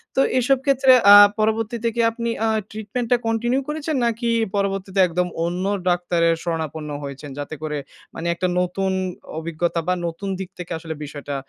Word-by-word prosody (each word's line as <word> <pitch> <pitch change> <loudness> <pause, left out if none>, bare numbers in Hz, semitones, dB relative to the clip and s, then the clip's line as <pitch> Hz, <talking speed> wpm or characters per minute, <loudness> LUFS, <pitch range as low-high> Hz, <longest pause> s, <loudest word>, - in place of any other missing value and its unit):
তো 270 - +4 0.2
এসব 265 +2 +3
ক্ষেত্রে 270 -1 +4 0.2
আ - - +12 0.2
পরবর্তীতে 225 +2 0
কি 230 - +3
আপনি 235 0 -3 0.2
আ - - +2 0.2
ট্রিটমেন্টটা 225 +3 -1
কন্টিনিউ 240 +4 +1
করেছেন? 310 0 -2
নাকি 235 0 -1 0.3
পরবর্তীতে 195 -1 -1
একদম 180 +1 -1 0.2
অন্য 180 +2 -2 0.2
ডাক্তারের 175 -1 +2
শরণাপন্ন 160 -2 -3
হয়েছেন, 140 +1 -7
যাতে 145 +2 -5
করে, 150 -1 -2 0.4
মানে 170 - -5
একটা 185 +1 -1
নতুন 190 +2 -1 0.5
অভিজ্ঞতা 170 +1 -2
বা 180 - +3
নতুন 170 +4 -5
দিক 190 -1 -5
থেকে 175 0 -7
আসলে 160 -1 -6
বিষয়টা 145 -1 -6
190 Hz, 155 wpm, -22 LUFS, 165-230 Hz, 0.5 s, আ